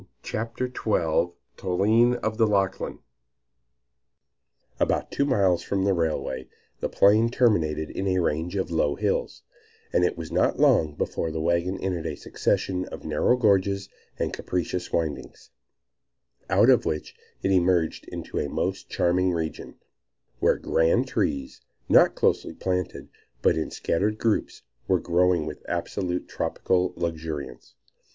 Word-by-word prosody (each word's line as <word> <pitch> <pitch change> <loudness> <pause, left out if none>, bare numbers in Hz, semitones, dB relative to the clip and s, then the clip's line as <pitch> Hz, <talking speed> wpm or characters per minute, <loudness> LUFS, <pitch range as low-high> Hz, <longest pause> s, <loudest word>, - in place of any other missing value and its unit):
CHAPTER 115 +3 -3
XII 85 -8 0 0.2
TOLINE 110 +7 +3
OF 110 +1 -2
THE 110 - +5
LACHLAN 100 -2 0 1.8
ABOUT - - 0
two 140 - +1
miles 100 -10 +2
from 95 -1 -1
the 100 0 +3
railway, 80 -6 -2 0.3
the - - -2
plain 110 +3 +4
terminated 80 -11 +1
in 95 - -3
a 95 -1 +1
range 85 +1 -1
of 95 -3 -2
low 75 -3 +1
hills, - - -2 0.5
and 90 - +3
it 90 - +1
was 80 -1 -7
not - - +1
long 75 -2 +4
before 80 - -2
the 80 0 -4
wagon 85 +3 0
entered 90 -4 -2
a 75 - -3
succession 90 +5 -1
of - - -9
narrow 80 +11 +2
gorges 100 -3 +2 0.3
and - - -2
capricious 90 0 -3
windings, 80 -4 -3 1.0
out - - +5
of - - +4
which 75 -1 -3 0.3
it 95 - +1
emerged 90 -3 +2
into - - -5
a - - -2
most - - -3
charming 90 +1 +2
region, 80 -2 -4 0.6
where - - +3
grand 80 0 +2
trees, 70 -2 -2 0.3
not - - +5
closely - - 0
planted, 90 -2 -3 0.4
but - - +4
in 80 -1 -2
scattered 105 +5 -1
groups, 110 - -1 0.2
were - - +3
growing 90 -1 +2
with 75 -1 -7
absolutely 90 -2 -2
tropical 90 0 0
luxuriance. 80 -3 -5
90 Hz, 135 wpm, -25 LUFS, 80-100 Hz, 1.8 s, THE